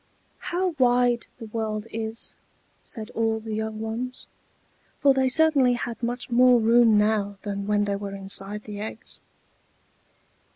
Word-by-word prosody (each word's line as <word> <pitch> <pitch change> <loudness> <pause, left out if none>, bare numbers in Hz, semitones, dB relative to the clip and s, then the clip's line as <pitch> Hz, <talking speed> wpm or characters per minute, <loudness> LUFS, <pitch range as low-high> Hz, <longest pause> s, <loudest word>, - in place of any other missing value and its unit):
"How 365 +2 -1
wide 245 -1 +3
the 235 - -8
world 215 -1 -3
is!" 225 0 -3 0.5
said 220 -1 -5
all 225 0 0
the 220 0 -6
young 220 0 -3
ones; 230 +3 -5 0.7
for 280 -1 +5
they 265 -1 +2
certainly 280 -3 +4
had 240 -1 -4
much 245 +1 -4
more 250 0 +6
room 230 -1 +5
now 210 -1 +1
than 200 -1 -4
when 205 0 +2
they 200 -1 -1
were 200 -1 -6
inside 195 +1 -1
the 205 -1 -8
eggs. 220 +3 -7
225 Hz, 140 wpm, -25 LUFS, 210-245 Hz, 0.7 s, more